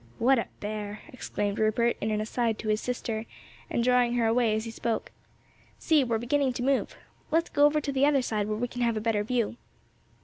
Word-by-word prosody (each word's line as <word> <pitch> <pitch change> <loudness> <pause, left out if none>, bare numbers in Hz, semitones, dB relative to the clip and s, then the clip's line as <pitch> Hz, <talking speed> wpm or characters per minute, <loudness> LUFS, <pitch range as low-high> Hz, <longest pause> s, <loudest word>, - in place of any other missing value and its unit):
"'What 260 +2 +4
a - - -3
bear!" 210 0 -5
exclaimed 205 -5 -3
Rupert 225 +2 +2
in 215 - 0
an 215 0 0
aside 225 0 -1
to 215 - -4
his 215 0 +1
sister, 225 -3 -3 0.4
and 235 - 0
drawing 250 -1 +3
her 235 -2 +2
away 225 -1 +3
as 220 +1 -2
he 230 - -5
spoke. 225 0 -3 0.7
"See, 310 -4 +3
we're 235 -3 0
beginning 260 +3 +1
to 245 - -4
move. 270 0 0 0.3
Let's 330 +2 +1
go 290 - +5
over 300 +1 +4
to 290 -1 -3
the 275 +1 +3
other 280 -3 +3
side 210 -3 -1
where 215 0 -2
we 245 +2 -1
can 245 0 -6
have 235 -2 +1
a - - +1
better 215 -1 0
view." 235 0 -1
235 Hz, 215 wpm, -28 LUFS, 215-255 Hz, 0.7 s, go